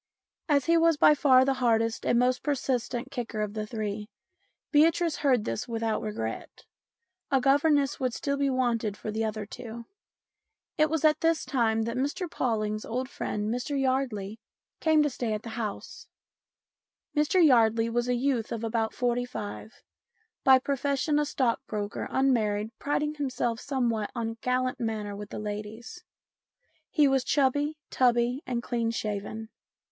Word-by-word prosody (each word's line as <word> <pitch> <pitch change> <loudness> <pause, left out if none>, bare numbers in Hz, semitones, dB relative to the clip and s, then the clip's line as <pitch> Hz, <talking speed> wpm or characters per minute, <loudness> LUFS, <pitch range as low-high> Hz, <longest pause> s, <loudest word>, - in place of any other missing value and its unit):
As 280 -3 +3
he 335 0 +4
was 330 -1 +4
by 300 - +7
far 260 -3 +5
the 270 - +2
hardest 230 -3 +1
and 240 - +3
most 250 +1 +2
persistent 260 -2 -2
kicker 240 -5 -4
of 210 -1 -2
the 215 -1 -4
three, 210 -1 -4 0.6
Beatrice 325 +2 +3
heard 255 -7 +2
this 115 - -3
without 225 -2 -1
regret; 115 - -5 0.6
a 270 - +3
governess 280 +1 +3
would 255 -1 0
still 280 -1 -1
be 280 0 +1
wanted 235 -5 0
for 215 - -5
the 220 +1 -1
other 215 -1 -3
two. 235 +1 -8 0.9
It 310 -1 +3
was 320 0 0
at 305 0 +4
this 330 0 +2
time 225 -4 +1
that 230 +2 -3
Mr 290 +8 -1
Pawling' 215 -8 -1
s 215 - -9
old 255 +3 -3
friend, 210 +2 -2
Mr 275 +3 -2
Yardley, 245 -6 -1 0.4
came 315 -1 +4
to 295 - +1
stay 240 -3 -2
at 210 0 -4
the 230 - -7
house. 220 -3 -6 1.1
Mr 300 +5 +2
Yardley 230 -4 +4
was 240 +1 -1
a 250 - +1
youth 245 -3 0
of 230 -1 -4
about 225 -1 -1
forty 245 0 0
five, 220 -1 -8 0.6
by 265 0 +7
profession 280 +2 0
a 300 - +1
stockbroker, 230 -6 -2
unmarried, 220 -5 +1
priding 295 +1 -1
him 290 -3 -2
self 240 -2 -1
somewhat 235 -7 -1
on 230 -2 -2
a 225 - -6
gallant 255 0 0
manner 215 -3 -3
with 205 0 -8
the - - -6
ladies. 215 +9 -6 0.9
He 300 -7 +4
was 270 -1 +2
chubby, 290 +3 +1
tubby, 245 +1 +2
and 240 -2 -2
clean 235 -2 -1
shaven. 215 0 -4
245 Hz, 160 wpm, -28 LUFS, 220-275 Hz, 1.1 s, by